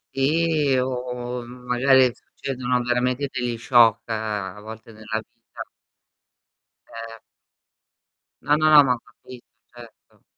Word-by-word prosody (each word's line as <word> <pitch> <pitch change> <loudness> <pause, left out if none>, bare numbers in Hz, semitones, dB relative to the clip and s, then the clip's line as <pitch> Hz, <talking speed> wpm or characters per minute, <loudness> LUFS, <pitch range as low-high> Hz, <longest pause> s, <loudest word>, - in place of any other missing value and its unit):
Sì 150 0 +1
o, 125 -1 -3
m 125 +1 -13
magari 130 0 +3
succedono 125 -1 -4
veramente 125 +3 -1
degli 120 -2 -3
shock 115 -2 +3
a 105 -3 -4
volte 110 +1 -11
nella 110 0 -5 0.2
vita. - - -11 1.3
Ehm 115 -1 -9 1.2
No, 145 - +2
no, 155 -1 +6
ma 125 -2 +2
ho 125 - -6
capito 125 +1 -16 0.3
certo. 120 -2 -17
125 Hz, 110 wpm, -23 LUFS, 115-130 Hz, 1.3 s, no